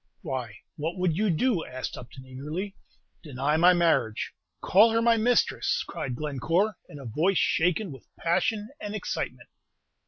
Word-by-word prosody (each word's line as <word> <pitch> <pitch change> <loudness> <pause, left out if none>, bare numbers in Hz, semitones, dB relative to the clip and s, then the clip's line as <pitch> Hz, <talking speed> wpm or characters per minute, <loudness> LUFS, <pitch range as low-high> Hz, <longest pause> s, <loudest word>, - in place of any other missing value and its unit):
"Why, 120 -5 -4 0.2
what 160 +4 -3
would 180 -3 +1
you 210 +3 +1
do?" 185 +2 +1
asked 130 0 -6
Upton, 125 +2 -11
eagerly. 150 +10 -5 0.5
"Deny 145 0 -1
my 175 +3 +7
marriage; 165 -11 +1 0.3
call 210 +5 +5
her 230 - +3
my 230 0 +4
mistress!" 235 +2 +2
cried 125 - -4
Glencore, 165 - 0
in 145 - -10
a 135 - -9
voice 165 - +1
shaken 180 +3 +1
with 135 - -12
passion 210 +5 0
and 210 0 -5
excitement. 215 - -4
165 Hz, 150 wpm, -27 LUFS, 135-205 Hz, 0.5 s, my